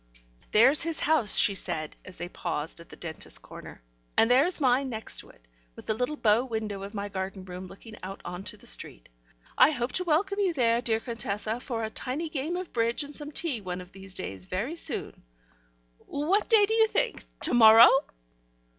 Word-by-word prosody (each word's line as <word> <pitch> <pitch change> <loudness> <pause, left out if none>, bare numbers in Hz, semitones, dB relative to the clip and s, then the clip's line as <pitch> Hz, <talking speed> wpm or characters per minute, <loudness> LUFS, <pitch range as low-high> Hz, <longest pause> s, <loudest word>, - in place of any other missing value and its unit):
"There's 255 +7 +5
his 330 -1 -2
house," 300 -9 +3
she 200 - +4
said, 160 -5 -3
as 185 - -12
they 175 - -5
paused 165 -3 -4
at 170 - -14
the - - -11
dentist's 160 -3 -1
corner, - - -12 0.3
"and 225 - +5
there's 290 +9 +4
mine 265 -1 +2
next 220 -2 -4
it, - - -20 0.3
with - - -12
the 220 - 0
little 250 +7 -2
bow 225 -3 +3
window 220 -5 -4
of 200 +2 -8
my 200 0 -3
garden 190 -1 -5
room 180 0 -8
looking 215 +4 -12
out 190 +1 -7
on 180 +2 -6
to - - -5
the - - -17
street. - - -5 0.5
I - - +8
hope 245 -4 -2
to 365 - +1
welcome 375 +5 0
you 375 -4 +1
there, 235 -3 +2
dear 225 -2 0
Contessa, 225 -1 -4
for 235 -3 -4
a 220 - -4
tiny 290 +9 -3
game 310 +3 -3
of 365 -1 -7
bridge 235 +4 +1
and 285 +1 -10
some 295 0 -6
tea 290 -7 -2
one 180 -1 -5
of 180 0 -11
these 195 -1 -12
days 95 - -6
very 220 - -3
soon. - - -1 0.9
What 345 +9 0
day 440 -3 +6
do 440 - -2
you 445 0 +4
think? 460 +1 -1 0.2
To - - +5
morrow?" 225 0 +9
230 Hz, 200 wpm, -27 LUFS, 195-295 Hz, 0.9 s, morrow